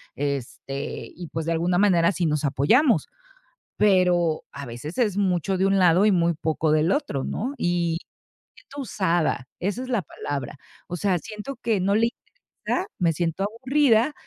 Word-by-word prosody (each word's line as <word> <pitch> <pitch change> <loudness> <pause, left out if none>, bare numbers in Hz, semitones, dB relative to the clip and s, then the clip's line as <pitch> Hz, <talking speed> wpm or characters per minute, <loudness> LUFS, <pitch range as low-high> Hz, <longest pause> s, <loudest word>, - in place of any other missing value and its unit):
este, 140 0 -4
y 175 0 -8
pues, 160 -1 -3
de 165 - 0
alguna 175 +2 +1
manera 180 -3 +4
sí 180 - -1
nos 150 -1 0
apoyamos, 220 - +3 0.7
pero 180 -5 +3
a 140 - -7
veces 120 +7 -7
es 215 -6 +1
mucho 190 -1 +1
de 190 - +2
un 195 0 +3
lado 180 +2 +5
y 210 - +5
muy 170 -1 +2
poco 155 0 -1
del 155 +3 +3
otro, 140 - -2
¿no?, 255 +6 -3
y 175 -5 0
me - - -64 0.4
siento 285 0 -9
usada, 175 - 0
esa 205 +7 -2
es 255 - -8
la 235 -5 +1
palabra, 145 -3 -5 0.3
o 175 - -4
sea, 185 -1 +1
siento 220 - -7
que 230 -4 0
no 200 +2 +2
le 230 +2 +4
interesa, 375 - -6
me 170 -2 +2
siento 170 +3 -1
aburrida 250 +3 +2
180 Hz, 170 wpm, -24 LUFS, 160-215 Hz, 0.7 s, lado